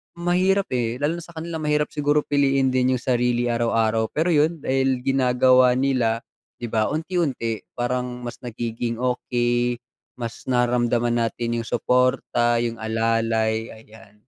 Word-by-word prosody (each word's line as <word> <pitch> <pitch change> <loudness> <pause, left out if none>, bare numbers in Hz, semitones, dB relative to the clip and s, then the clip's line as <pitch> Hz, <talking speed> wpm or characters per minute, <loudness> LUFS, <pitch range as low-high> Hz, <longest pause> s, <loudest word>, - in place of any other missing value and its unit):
mahirap, 185 +2 +1
eh, 120 -2 -1
lalo 165 +3 0
na - - -9
sa 170 - -16
kanila 160 0 -5
mahirap 150 -1 0
siguro 150 0 +1
piliin 135 -2 +2
din 130 0 +2
yung 120 - -5
sarili 120 -1 +1
araw-araw 115 -1 +1
pero 165 +3 +1
yun 155 0 +1
dahil 130 -1 0
ginagawa 130 -1 +4
nila, 125 -4 +1 0.3
di 120 -2 -7
ba 110 -1 +1
unti-unti 150 - -2 0.2
parang 125 0 -3
mas 120 - -7
nagiging 115 -1 -4
okey, 120 -1 0 0.4
mas 115 0 -7
nararamdaman 120 -1 +1
natin 120 0 -3
yung 115 - -6
suporta, 125 -1 +1
yung 115 -1 -3
alalay, 110 0 0
ayan. 110 -1 -17
125 Hz, 140 wpm, -23 LUFS, 115-135 Hz, 0.4 s, ginagawa